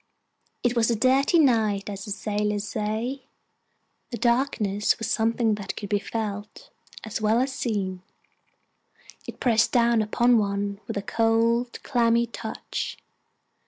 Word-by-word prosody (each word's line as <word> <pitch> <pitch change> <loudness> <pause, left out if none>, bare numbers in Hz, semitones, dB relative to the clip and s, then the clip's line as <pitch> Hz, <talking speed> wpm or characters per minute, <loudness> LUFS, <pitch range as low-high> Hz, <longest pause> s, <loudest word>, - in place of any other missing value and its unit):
It 245 0 +1
was 230 -1 +2
a 235 - +2
dirty 265 +8 +3
night, 220 -9 +3
as 200 -1 -6
the 205 - -7
sailors 210 0 -2
say. 225 +5 -3 0.8
The 240 - -5
darkness 235 -4 +1
was 225 - -4
something 225 0 +2
that 205 -2 -5
could 205 - -6
be 205 -1 +2
felt 210 -1 -5 0.3
as 220 0 -4
well 215 +2 +3
as 265 +1 0
seen 195 -8 -2 1.3
it - - -8
pressed 225 -3 +3
down 235 -2 +3
upon 235 +3 +3
one 200 -1 -2
with - - -4
a 200 - -3
cold, 230 +2 +1
clammy 235 -2 +2
touch. 235 - -5
225 Hz, 135 wpm, -25 LUFS, 210-235 Hz, 1.3 s, dirty